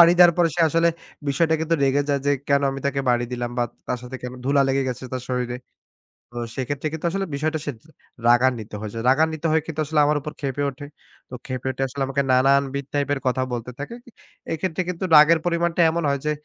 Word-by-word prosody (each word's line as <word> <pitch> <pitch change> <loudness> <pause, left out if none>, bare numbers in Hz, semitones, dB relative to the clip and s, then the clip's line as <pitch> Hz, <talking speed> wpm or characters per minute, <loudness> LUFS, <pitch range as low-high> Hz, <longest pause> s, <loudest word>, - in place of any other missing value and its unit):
বাড়ি 170 0 +9
দেওয়ার 175 -1 +8
পরে 170 -1 +4
সে - - +1
আসলে 165 +2 +3 0.4
বিষয়টা 160 +3 +2
কিন্তু 160 +1 +1
রেগে 140 +1 +3
যায় 140 -1 +1
যে, 145 - +4 0.2
"কেন 140 0 +3
আমি 135 0 -5
তাকে 140 0 0
বাড়ি 120 -1 +2
দিলাম!" 120 -1 -3
বা 120 - +3 0.2
তার 125 - -2
সাথে 125 +1 -7
কেন 125 0 -5
ধুলা 140 +1 +3
লেগে 135 0 +1
গেছে 125 +1 -5
তার 130 -1 -3
শরীরে। 125 -1 -2 0.7
তো 120 - -14 0.2
সেক্ষেত্রে 135 +3 -3
কিন্তু 160 +1 -3
আসলে 195 +2 -2
বিষয়টা 155 +2 -1
সে - - 0
জ - - -30 0.4
রাগান্বিত 120 -2 +3
হয়েছে। 110 +1 -6
রাগান্বিত 160 +4 +2
হয়ে 160 0 +2
কিন্তু 160 -2 -4
আসলে 150 0 +1
আমার 150 0 +2
উপর 150 +2 -6
ক্ষেপে 140 0 -2
ওঠে। 140 +2 -10 0.4
তো 125 - -9
ক্ষেপে 130 -1 -5
উঠে 130 +1 -5
আসলে 135 +1 -4 0.3
নানান 135 +2 +5
বিধ 140 -1 -3
type 145 0 0
এর 140 - -6
কথা 130 0 +1
বলতে 120 0 -4
থাকে। 145 +11 -6
ই - - -13 0.4
এইক্ষেত্রে 165 +2 -1
কিন্তু 180 0 -3
রাগের 155 +2 +8
পরিমাণটা 170 0 +1
এমন 170 +1 -1
হয় 140 - 0
যে, - - +2
140 Hz, 220 wpm, -23 LUFS, 130-160 Hz, 0.7 s, বাড়ি